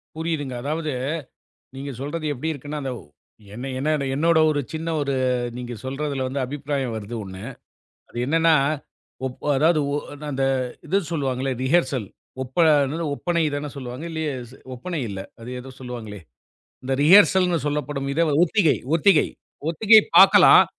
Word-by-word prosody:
புரியுதுங்க. 155 -5 -3
அதாவது, 155 +2 -2 0.9
நீங்க 140 +1 -5
சொல்றது 155 +3 -4
எப்படி 160 +6 -3
இருக்குன்னா, 150 +1 -6
அந்த 130 - -2
ஒ - - -14 0.5
என்ன 125 +4 -6
என்னை 150 0 0
என்னோடைய 160 +2 +3
ஒரு 145 - 0
சின்ன 160 +1 -4
ஒரு 140 -1 -1 0.4
நீங்க 120 -1 -6
சொல்றதில 135 0 -3
வந்து 135 +1 -3
அபிப்பிராயம் 140 -3 -3
வருது 110 +1 -6
1. 95 0 -9 0.7
அது 120 - -8
என்னானா, 165 +2 +3 0.7
ஒப் 125 - -8
அ - - +3
அதாவது 155 +2 +3
ஒ - - +1 0.2
நா 150 - -7
அந்த 135 0 0 0.4
இது 195 - +2
சொல்லுவாங்கள்ல 135 -3 -1
ரிஹர்சல் 135 - +1 0.4
ஒப்ப, 130 0 -10 0.3
என்னது, 160 +5 -3
ஒப்பனை 170 +1 0
தானே 145 +1 -3
சொல்லுவாங்க? 130 +3 -6
இல்லையே! 160 -2 -2 0.4
ஒப்பனை 165 +6 -5
இல்லை. 95 -1 -6 0.2
அது 115 - -9
ஏதோ 130 +1 -10
சொல்லுவாங்களே, 115 -6 -7 0.6
இந்த 135 - -2
ரிஹர்சல்னு 180 +1 +6
சொல்லப்படும் 145 -1 -2
இத 165 - +2
வ 150 - +1
ஒத்திகை 180 -3 +2 0.2
ஒத்திகை 170 -1 +4 0.4
ஒத்திகை 215 +6 +6 0.2
பாக்கலாம். - - +8
145 Hz, 145 wpm, -23 LUFS, 130-160 Hz, 0.9 s, பாக்கலாம்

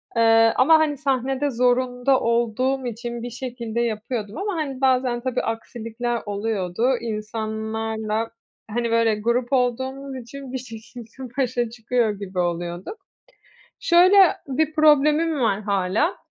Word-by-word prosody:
Eee, 225 0 +5
ama, 315 +5 +6
hani, 300 -2 +1
sahnede 270 0 0
zorunda 250 +1 +2
olduğum 240 +3 0
için 235 +1 -5
bir 245 - -4
şekilde 235 -2 -4
yapıyordum 220 0 -3
ama, 400 -1 -2
hani, 275 -4 -4
bazen, 255 -2 +2
tabii 255 0 -1
aksilikler 230 +1 -4
oluyordu. 205 +3 -1
İnsanlarla, 220 0 -3 0.4
hani, 235 +1 -1
böyle, 230 -1 +3
grup 235 +4 -1
olduğumuz 260 +2 -1
için 260 +2 -9
bir - - -1
şekilde 245 +1 -10
başa 245 -3 0
çıkıyor 235 0 0
gibi 185 -2 -5
oluyorduk. 175 - -3 0.8
Şöyle, 360 +3 +5 0.3
bir 310 +3 0
problemim 305 0 +4
var 210 -3 +1
hâlâ, 200 - 0
240 Hz, 120 wpm, -23 LUFS, 220-265 Hz, 0.8 s, ama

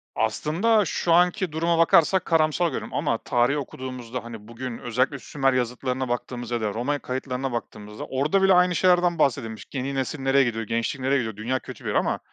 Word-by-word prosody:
Aslında, 175 - +1
şu 170 +1 0
anki 180 0 +3
duruma 165 +2 +1
bakarsak 170 +2 +4
karamsar 160 +1 +2
görüyorum - - -5
ama 145 -6 0
tarihi 120 +5 +1
okuduğumuzda 130 -3 -6
hani, 115 -2 -10
bugün 115 0 -6
özellikle 130 +4 -1
Sümer 135 -2 0
yazıtlarına 125 +1 -2
baktığımızda 120 0 -4
ya 115 - -2
da 105 -2 -1
Roma 140 +5 -1
kayıtlarına 130 +1 -3
baktığımızda, 105 -2 -6
orada 150 +9 +1
bile 195 - +6
aynı 180 0 +4
şeylerden 175 -1 +3
bahsedilmiş. 115 -5 0
Yeni 135 +1 -3
nesil 135 +2 -2
nereye 135 +1 +3
gidiyor, 115 -2 -2
gençlik 115 +6 -2
nereye 135 +2 +2
gidiyor, 110 -5 -3
dünya 125 +5 -2
kötü - - -11
bir - - -1
yer - - -2
ama - - +1
130 Hz, 185 wpm, -24 LUFS, 120-160 Hz, -, bile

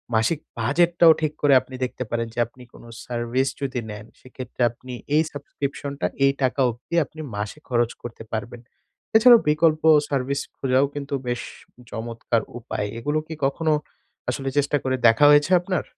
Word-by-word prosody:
মাসিক 115 +8 +2 0.2
বাজেটটাও 170 +7 +4
ঠিক 155 -1 0
করে 145 -1 +5
আপনি 130 - -11
দেখতে 125 - -5
পারেন 115 0 -1
যে - - -5
আপনি 125 +1 -16
কোনো 120 - -14 0.2
সার্ভিস 120 +2 -1
যদি 130 -2 -2
নেন, 105 0 -8
সেক্ষেত্রে 130 -1 -9
আপনি 125 +1 -11 0.2
এই 155 - +5
সাবস্ক্রিপশনটা 140 0 -4 0.2
এই 135 - +4
টাকা 130 +2 0
অবধি 120 +8 -6
আপনি 155 +2 -11
মাসে 105 +8 -5
খরচ 120 -1 +1
করতে 115 -1 -8
পারবেন। 115 +2 -5 0.6
এছাড়াও 240 +1 +8
বিকল্প 155 0 +2 0.3
সার্ভিস 140 0 -1 0.2
খোঁজাও 130 +1 +2
কিন্তু 140 0 -5
বেশ 120 0 -1 0.5
চমৎকার 115 0 -2 0.2
উপায়। 105 -2 -4
এগুলো 145 +5 0
কি 160 - -6
কখনো 155 +3 +1 0.6
আসলে 135 +2 -2
চেষ্টা 145 +1 +2
করে 130 0 0
দেখা 115 +6 +5
হয়েছে 145 +4 +4
আপনার? 185 0 -2
135 Hz, 160 wpm, -23 LUFS, 120-150 Hz, 0.6 s, এছাড়াও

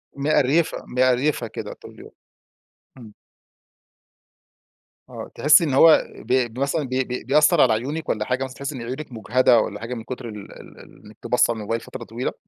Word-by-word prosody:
مقريفة، 150 +2 +1
مقريفة 130 +1 +1
كده - - -7
طول - - -14
اليوم. - - -14 0.9
امم. 110 -4 -13 2.0
آه - - -9
تحسي 150 +3 +5
إن 145 -5 -1
هو 155 +4 +6
ب 125 -3 -1
بمثلًا 140 +5 -1
بي 130 0 -1
بي 125 0 -6
بيأثر 150 +4 +4
على 120 - +4
عيونك 140 +8 -4
والّا 105 -1 -1
حاجة 125 +2 -1
مثلًا 130 0 -7
تحسي 140 +1 -6
إن 125 - -7
عيونك 130 +5 -7
مجهدة 120 +1 +2
والّا 105 -1 -3
حاجة 115 +3 -6
من 115 -2 -6
كتر 125 0 -7
ال 105 -2 -10
ال - - -14
ال - - -16
إن - - -14
أنتِ 110 - -12
باصة 125 -1 +2
للموبايل 115 +1 -4
فترة 130 - -9
طويلة؟ 120 +2 -4
130 Hz, 180 wpm, -22 LUFS, 115-140 Hz, 2.0 s, هو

